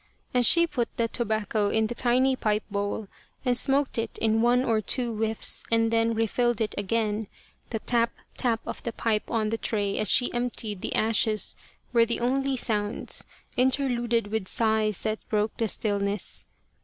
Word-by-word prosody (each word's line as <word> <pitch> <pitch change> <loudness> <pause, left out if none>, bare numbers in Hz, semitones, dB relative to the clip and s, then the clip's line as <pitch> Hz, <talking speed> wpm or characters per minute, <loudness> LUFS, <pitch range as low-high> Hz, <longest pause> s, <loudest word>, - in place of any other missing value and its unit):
As 245 -1 +5
she 340 0 +7
put 245 -8 -2
the 230 - +1
tobacco 220 -3 -1
in 220 +1 +1
the 230 - -3
tiny 255 +2 +2
pipe 215 -3 0
bowl 205 +1 -3 0.4
and 250 -1 +2
smoked 270 -1 +2
it 225 0 -3
in 225 0 +1
one 245 +2 +3
or 220 -2 +1
two 235 +2 0
whiffs 220 0 +2
and 225 0 +2
then 230 0 +2
refilled 230 +1 0
it 220 -2 -1
again, 215 +1 -1 0.4
the 225 - -2
tap, 235 +1 +1 0.2
tap 230 -3 0
of - - -6
the 235 - -4
pipe 215 -2 -1
on 220 -2 0
the 225 +1 -2
tray 205 -2 -1
as 215 - 0
she 245 - +4
emptied 235 -5 -3
the - - -3
ashes 220 -1 +2 0.4
were 235 -1 +5
the 235 +1 0
only 270 +2 0
sounds, 210 -3 -1 0.3
interluded 245 -3 +2
with 220 -4 -2
sighs 220 -2 +1
that 215 0 -1
broke 210 0 0
the 230 - 0
stiUness. 205 -1 -2
225 Hz, 170 wpm, -26 LUFS, 215-240 Hz, 0.4 s, she